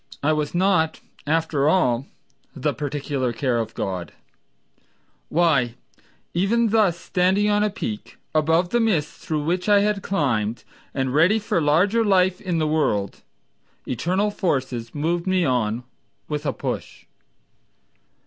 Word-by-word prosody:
I 155 Hz, +2 st, +3 dB
was 150 Hz, +1 st, -2 dB
not, 180 Hz, -3 st, +2 dB, 0.3 s
after 155 Hz, -2 st, +1 dB
all, 135 Hz, -8 st, +2 dB, 0.5 s
the -, -, -1 dB
particular 145 Hz, -3 st, -2 dB
care 120 Hz, 0 st, 0 dB
of 115 Hz, 0 st, -4 dB
God 90 Hz, -4 st, -4 dB, 1.2 s
Why, 140 Hz, -8 st, +2 dB, 0.6 s
even 225 Hz, +6 st, +2 dB
thus 205 Hz, -6 st, +3 dB
standing 190 Hz, +4 st, +1 dB
on 205 Hz, 0 st, +2 dB
a 210 Hz, -, +2 dB
peak 215 Hz, 0 st, -6 dB, 0.2 s
Above 160 Hz, +3 st, +2 dB
the 240 Hz, -, +1 dB
mists 190 Hz, -10 st, 0 dB
through 155 Hz, -2 st, -2 dB
which 180 Hz, +6 st, -1 dB
I 205 Hz, -1 st, +6 dB
had 205 Hz, -1 st, 0 dB
climbed, 120 Hz, -, -1 dB, 0.3 s
And 130 Hz, -1 st, -1 dB
ready 170 Hz, +9 st, +4 dB
for 200 Hz, -5 st, 0 dB
larger 180 Hz, +10 st, +3 dB
life 185 Hz, -3 st, +2 dB
in 180 Hz, -3 st, -1 dB
the 155 Hz, -, +1 dB
world, 125 Hz, -11 st, 0 dB, 0.7 s
Eternal 185 Hz, -, 0 dB
forces 130 Hz, -, -2 dB
Moved 170 Hz, +4 st, -1 dB
me 185 Hz, -2 st, +2 dB
on 120 Hz, -3 st, 0 dB, 0.4 s
with 150 Hz, 0 st, -3 dB
a 135 Hz, -, 0 dB
push. -, -, -5 dB
160 Hz, 135 wpm, -23 LUFS, 135-190 Hz, 1.2 s, I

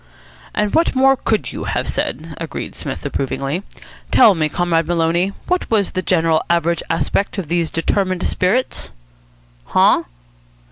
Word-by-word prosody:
'" -, -, -21 dB
"And 210 Hz, -1 st, 0 dB
what 330 Hz, -3 st, +2 dB
more 270 Hz, +1 st, +5 dB
could 225 Hz, -4 st, -1 dB
you -, -, -6 dB
have -, -, -2 dB
said?" 160 Hz, +5 st, -3 dB
agreed 165 Hz, -1 st, -5 dB
Psmith -, -, -6 dB
approvingly. 140 Hz, +5 st, -2 dB, 0.5 s
"Tell 215 Hz, -, +6 dB
me, 155 Hz, -3 st, 0 dB
Comrade 165 Hz, -1 st, 0 dB
Maloney, 170 Hz, +2 st, +1 dB
what 360 Hz, 0 st, -1 dB
was 210 Hz, -4 st, +1 dB
the 185 Hz, -, -2 dB
general 165 Hz, -2 st, +2 dB
average 170 Hz, 0 st, +1 dB
aspect 165 Hz, +6 st, 0 dB
of 180 Hz, -6 st, -4 dB
these 170 Hz, -1 st, 0 dB
determined 185 Hz, +2 st, 0 dB
spirits?" 215 Hz, +8 st, 0 dB, 0.8 s
"Huh?" -, -, +3 dB
175 Hz, 145 wpm, -19 LUFS, 165-200 Hz, 0.8 s, Tell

